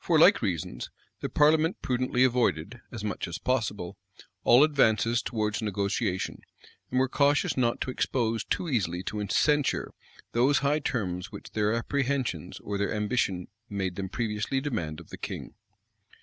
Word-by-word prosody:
For - - +3
like - - +7
reasons, 85 -5 -3 0.3
the - - -3
parliament 155 +3 +3
prudently 125 0 +1
avoided, 120 -4 +1
as 110 -3 -6
much 105 -2 -3
as 85 - -4
possible, 105 -7 -2 0.4
all 125 +4 +7
advances 115 -6 +3
towards 105 -1 -1
negotiation, 100 -3 -1 0.5
and 130 - +1
were 130 - +3
cautious 145 +2 +2
not 120 -2 +1
to 130 - -1
expose 115 -4 0
too 180 - -2
easily 95 - 0
to 105 +1 -3
censure 145 +2 +2 0.4
those 130 +4 +3
high 145 +2 +3
terms 95 -9 -2
which - - -9
their 105 -1 +1
apprehensions 120 - -1
or 100 -1 -3
their 100 - 0
ambition 105 -4 0 0.2
made 95 -3 -2
them 95 0 -4
previously 110 +4 -1
demand 105 - -3
of - - -14
the - - -7
king. - - -6
115 Hz, 150 wpm, -28 LUFS, 100-130 Hz, 0.5 s, like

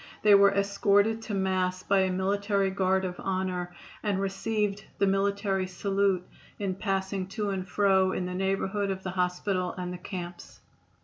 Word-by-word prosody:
They 210 -1 +7
were 200 0 +8
escorted 200 +2 +2
to 215 -2 -4
Mass 185 -1 0
by 200 -1 +3
a 190 -1 +2
military 195 +1 +1
guard 190 0 +1
of 180 -1 -5
honor, 185 -2 -2 0.3
and 205 -3 0
received 200 +1 -1
the 200 - +3
military 195 -1 +1
salute 195 0 0 0.3
in 195 -2 -2
passing 195 -1 -2
to 205 +1 -2
and 185 -1 -4
fro 190 -2 +3
in 185 - -2
the 180 - -4
neighborhood 195 +2 -1
of 190 -1 -3
the 185 - -3
hospital 180 0 -1
and 180 0 -4
the 180 - -7
camps. 175 -1 -7
195 Hz, 165 wpm, -28 LUFS, 185-200 Hz, 0.3 s, were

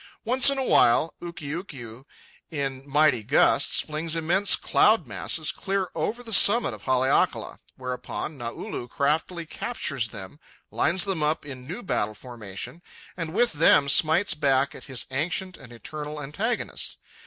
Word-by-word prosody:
Once 255 +4 +5
in 275 - 0
a 265 - 0
while, 155 - +4
Ukiukiu, 145 - -7 0.4
in 140 -3 -4
mighty 150 -4 +3
gusts, 105 - +3
flings 155 +2 -4
immense 175 +5 +3
cloud 215 -6 +3
masses 130 - -1
clear 195 -1 -2
over 220 +10 -3
the 225 -2 -5
summit 225 +4 +5
of - - -11
Haleakala; 130 0 +1 0.2
whereupon 125 +4 -5
Naulu 120 -1 -6
craftily 160 +4 -1
captures 140 - -2
them, 105 +6 -9 0.3
lines 175 +2 +2
them 190 -5 -2
up 150 0 0
in 130 -3 -9
new 190 +10 -6
battle 110 - -1
formation, 115 - -8 0.3
and 165 -3 -5
with 235 +4 +2
them 145 -2 +5
smites 160 +6 +3
back 140 -3 +1
at - - -11
his 130 -3 -3
ancient 180 +7 -2
and 125 -3 -14
eternal 150 +5 -7
antagonist. 195 - -3
150 Hz, 140 wpm, -25 LUFS, 130-180 Hz, 0.4 s, Once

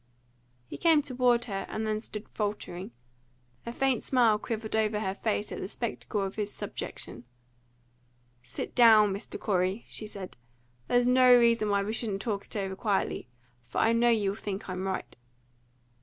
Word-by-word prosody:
He - - -8
came 320 -3 +4
toward 250 -3 +2
her, 195 -3 -4
and 220 0 -3
then 215 0 0
stood 215 -1 -7
faltering. 205 -3 -4 0.8
A - - -2
faint 265 -1 +1
smile 235 -5 +3
quivered 220 -1 -4
over 215 -1 +1
her 190 -3 -1
face 210 0 -2
at - - -5
the - - -4
spectacle 215 -1 -3
of 195 +1 -4
his 210 -1 -2
subjection. 120 - -6 1.2
"Sit 125 - -6
down, 220 -4 +7
Mr. 200 +3 -6
Corey," 190 +1 0
she 215 - -5
said. 195 -7 -8 0.5
"There's 245 0 +3
no 255 0 +6
reason 230 -3 +3
why 200 -1 +2
we 210 +2 -3
shouldn't 210 -4 -3
talk 205 -4 -2
it - - -10
over 195 -2 -2
quietly; 200 - -1 0.3
for 120 +1 -9
I 225 - +4
know 235 +1 +4
you 210 -4 +2
will 200 - -7
think 200 -1 -5
I'm 185 0 -3
right." 190 - -4
215 Hz, 170 wpm, -29 LUFS, 195-235 Hz, 1.2 s, down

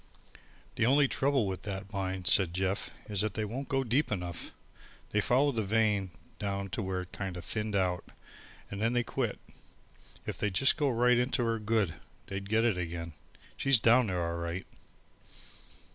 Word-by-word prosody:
"The 115 - +3
only 140 +2 +5
trouble 135 -3 +1
with 95 -1 -3
that 100 0 -6
mine," 95 -2 -2
said 90 -3 +4
Jeff, 95 +1 -1 0.2
"is 100 -2 +1
they 110 0 -1
won't 130 +6 -5
go 135 -1 +1
deep 130 +4 +1
enough. 90 -4 -4 0.6
They 105 - +2
followed 130 +3 +2
the - - +3
vein 105 -2 +2 0.3
down 100 -1 -2
to 110 - -2
where 95 -2 -2
it 90 - -10
kind 95 -3 -4
o' - - -4
thinned 105 +1 -2
out 90 -2 +1 0.7
and 100 +1 -4
then 115 +2 +2
they 120 0 +2
quit. - - -2 0.9
If - - -4
they'd 105 -3 -1
just 135 +5 +5
go 145 -2 +1
right 125 0 +4
into 125 +1 +1
her 115 -1 0
good, 105 -5 +1 0.3
they'd 100 0 -5
get 110 +2 +3
it 110 -6 +2
again. 85 -1 -4 0.4
She's 135 -4 +4
down 115 +2 +5
there 90 -3 -1
all 85 0 -3
right." 85 +2 -3
105 Hz, 175 wpm, -31 LUFS, 95-120 Hz, 0.9 s, only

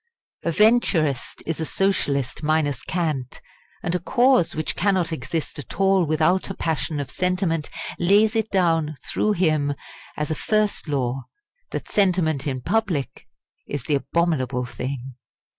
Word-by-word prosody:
A - - -1
Venturist 170 - +2
is 165 0 -2
a - - 0
Socialist 140 -9 0
minus 150 -3 +1
cant, 155 -8 -2 0.4
and 170 - -1
a 180 - +1
cause 245 +1 +3
which 155 -1 -2
cannot 185 -3 +1
exist 155 +3 -4
at 145 - -8
all 195 -2 +4
without 155 +5 +2
a 195 - -4
passion 160 -1 -1
of 140 - -4
sentiment 180 -4 0 0.3
lays 205 +5 +4
it 220 -1 +1
down 165 -5 +2
through 215 - +1
him 155 -6 +1 0.4
as 150 +1 -2
a - - +3
first 215 +3 0
law, 135 -2 -1 0.4
that - - -5
sentiment 175 -8 +2
in 130 -2 -2
public 190 -8 -1 0.4
is 145 -4 -4
the 150 - -1
abominable 140 -4 0
thing. 130 +1 -5
160 Hz, 140 wpm, -23 LUFS, 145-190 Hz, 0.4 s, all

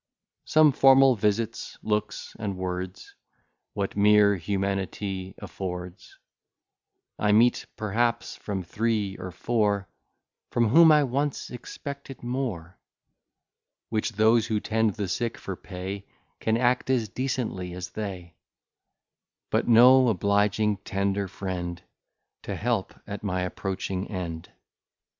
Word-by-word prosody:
Some 155 -1 +5
formal 135 -1 +6
visits, 105 +1 -1
looks, 105 0 -2
and 100 -3 -3
words, 90 0 -5 0.6
What 100 -1 -2
mere 105 0 +5
humanity 95 0 -3
affords, 90 -1 -7 1.0
I 105 - +2
meet 120 +3 +4
perhaps 115 +3 -1
from 95 -3 -4
three 105 +1 -1
or 90 - -6
four, 105 +1 0 0.6
From 115 -2 +2
whom 160 +6 +7
I 150 -1 +6
once 140 +2 -2
expected 140 +2 -8
more; 120 -9 -4 1.1
Which 110 0 -1
those 110 +2 +4
who 110 -1 0
tend 110 -1 0
the 105 -3 -2
sick 120 +4 -2
for - - -6
pay, 95 +2 -7 0.3
Can 110 0 +1
act 125 +1 +1
as 125 -4 +2
decently 120 -7 -3
as 90 0 -6
they: 95 -5 -6 1.2
But - - +1
no 125 +2 +7
obliging, 105 0 +2
tender 100 0 -1
friend, 90 -2 -5 0.6
To - - -5
help - - -1
at 100 0 -7
my 90 -3 -1
approaching 95 +1 -3
end. 85 -5 -5
105 Hz, 115 wpm, -26 LUFS, 95-120 Hz, 1.2 s, whom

